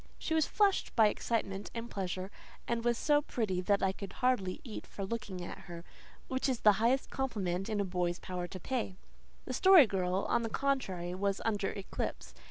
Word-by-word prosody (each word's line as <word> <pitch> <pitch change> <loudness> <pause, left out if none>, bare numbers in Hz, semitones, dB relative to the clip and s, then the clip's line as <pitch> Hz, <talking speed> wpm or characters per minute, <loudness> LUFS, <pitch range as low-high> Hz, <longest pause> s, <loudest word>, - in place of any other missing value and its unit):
She 320 - -3
was 315 -2 +3
flushed 405 -2 +2
with 220 -2 +7
excitement 200 -4 -2
and 230 0 -4
pleasure, 190 -2 -4 0.4
and 235 -1 -1
was 240 -1 +2
so 295 +3 +3
pretty 210 -10 -1
that 200 +2 +2
I 190 - +3
could 195 0 -8
hardly 245 -8 +1
eat 230 -7 -7
for 195 - -5
looking 190 -4 -4
at - - -7
her 170 -1 -8 0.4
which 260 +1 0
is 250 -3 -1
the 210 - +8
highest 255 +4 +2
compliment 195 -8 -2
in 215 -1 -1
a 200 - +1
boy's 180 -1 -1
power 180 -1 -4
to 185 - -8
pay. 230 -2 -2 0.5
The - - -4
Story 375 -6 +8
Girl, 185 -2 0
on - - +2
the 225 - -2
contrary, 200 -11 -1
was 200 +1 0
under 210 -3 0
eclipse. 195 - -5
205 Hz, 190 wpm, -32 LUFS, 185-240 Hz, 0.5 s, the